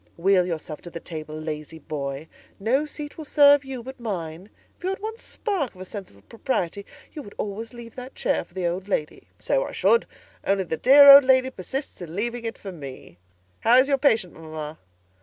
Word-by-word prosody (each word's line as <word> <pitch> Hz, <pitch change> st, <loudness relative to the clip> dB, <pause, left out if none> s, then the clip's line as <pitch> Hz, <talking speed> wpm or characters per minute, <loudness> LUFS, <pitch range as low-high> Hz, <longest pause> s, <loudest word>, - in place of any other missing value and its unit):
"Wheel 180 Hz, +1 st, +3 dB
yourself 160 Hz, -3 st, -5 dB
to 175 Hz, -, -9 dB
the 170 Hz, -, -7 dB
table, 155 Hz, -2 st, -7 dB
lazy 155 Hz, 0 st, -6 dB
boy: 140 Hz, -1 st, -5 dB, 0.3 s
no 260 Hz, +9 st, +1 dB
seat 295 Hz, +1 st, -8 dB
will 310 Hz, -, -6 dB
serve 285 Hz, -1 st, +6 dB
you 265 Hz, -3 st, -7 dB
but 265 Hz, +1 st, -9 dB
mine; 180 Hz, -4 st, -5 dB, 0.3 s
if -, -, -24 dB
you 370 Hz, -, 0 dB
had 385 Hz, -, -2 dB
one 440 Hz, +2 st, -6 dB
spark 375 Hz, -, -3 dB
of 185 Hz, -, -12 dB
a -, -, -6 dB
sense 195 Hz, 0 st, -8 dB
of 100 Hz, 0 st, -21 dB
propriety, 200 Hz, -5 st, -3 dB, 0.3 s
you 305 Hz, -, -6 dB
would 205 Hz, -6 st, -12 dB
always 215 Hz, +2 st, -4 dB
leave 235 Hz, -1 st, -11 dB
that 255 Hz, +1 st, -8 dB
chair -, -, 0 dB
for 175 Hz, -, -26 dB
the 185 Hz, -2 st, -2 dB
Old 180 Hz, +3 st, -2 dB
Lady." 155 Hz, -6 st, -3 dB
"So -, -, 0 dB
I -, -, -7 dB
should; 465 Hz, -, +3 dB, 0.4 s
only 195 Hz, 0 st, +1 dB
the 165 Hz, -, -3 dB
dear 280 Hz, -, +8 dB
Old 280 Hz, 0 st, +12 dB
Lady 260 Hz, 0 st, +3 dB
persists 265 Hz, +4 st, -6 dB
in 170 Hz, -1 st, -7 dB
leaving 235 Hz, +3 st, -3 dB
it 225 Hz, -, -4 dB
for 195 Hz, -, -8 dB
me. 135 Hz, -, -10 dB, 0.4 s
How 235 Hz, +2 st, +5 dB
is 260 Hz, +1 st, +5 dB
your 275 Hz, -1 st, +2 dB
patient, 225 Hz, -, +2 dB
mamma?" 155 Hz, -1 st, -8 dB
200 Hz, 210 wpm, -24 LUFS, 165-265 Hz, 0.4 s, Old